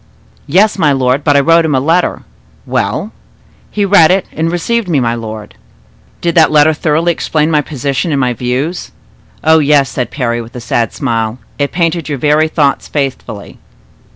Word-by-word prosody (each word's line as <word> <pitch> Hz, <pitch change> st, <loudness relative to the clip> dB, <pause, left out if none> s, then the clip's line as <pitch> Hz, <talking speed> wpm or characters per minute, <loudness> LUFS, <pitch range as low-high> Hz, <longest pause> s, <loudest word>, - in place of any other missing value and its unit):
"Yes, 195 Hz, +7 st, +2 dB
my 150 Hz, -4 st, +3 dB
lord; 130 Hz, +1 st, +1 dB
but 145 Hz, -2 st, +3 dB
I -, -, +5 dB
wrote 165 Hz, +3 st, +4 dB
him 155 Hz, -3 st, 0 dB
a -, -, +2 dB
letter." 165 Hz, +6 st, 0 dB, 0.4 s
"Well?" -, -, -2 dB, 0.6 s
"He 205 Hz, -1 st, -1 dB
read 185 Hz, -5 st, +5 dB
it, 190 Hz, +1 st, +2 dB
and 165 Hz, +2 st, -2 dB
received 200 Hz, +4 st, -1 dB
me, 155 Hz, -5 st, +2 dB
my 115 Hz, -2 st, 0 dB
lord." 110 Hz, -2 st, -7 dB, 0.7 s
"Did 170 Hz, -1 st, 0 dB
that 165 Hz, -2 st, +5 dB
letter 155 Hz, +1 st, +4 dB
thoroughly 160 Hz, +2 st, +1 dB
explain 155 Hz, -1 st, -1 dB
my 150 Hz, -1 st, +3 dB
position 140 Hz, +2 st, -3 dB
and 140 Hz, -, 0 dB
my 125 Hz, -2 st, +1 dB
views?" 130 Hz, +9 st, -3 dB, 0.5 s
"Oh, 160 Hz, 0 st, +5 dB
yes!" 145 Hz, -3 st, +2 dB
said 125 Hz, -, -3 dB
Parry, 120 Hz, -4 st, -2 dB
with 115 Hz, +3 st, -12 dB
a -, -, -5 dB
sad 115 Hz, -1 st, -1 dB
smile; 115 Hz, -3 st, -2 dB, 0.2 s
"it 140 Hz, 0 st, 0 dB
painted 165 Hz, -2 st, -1 dB
your 145 Hz, -, -2 dB
very 150 Hz, +4 st, +2 dB
thoughts 150 Hz, -3 st, 0 dB
faithfully." 130 Hz, -7 st, -5 dB
150 Hz, 180 wpm, -13 LUFS, 130-165 Hz, 0.7 s, I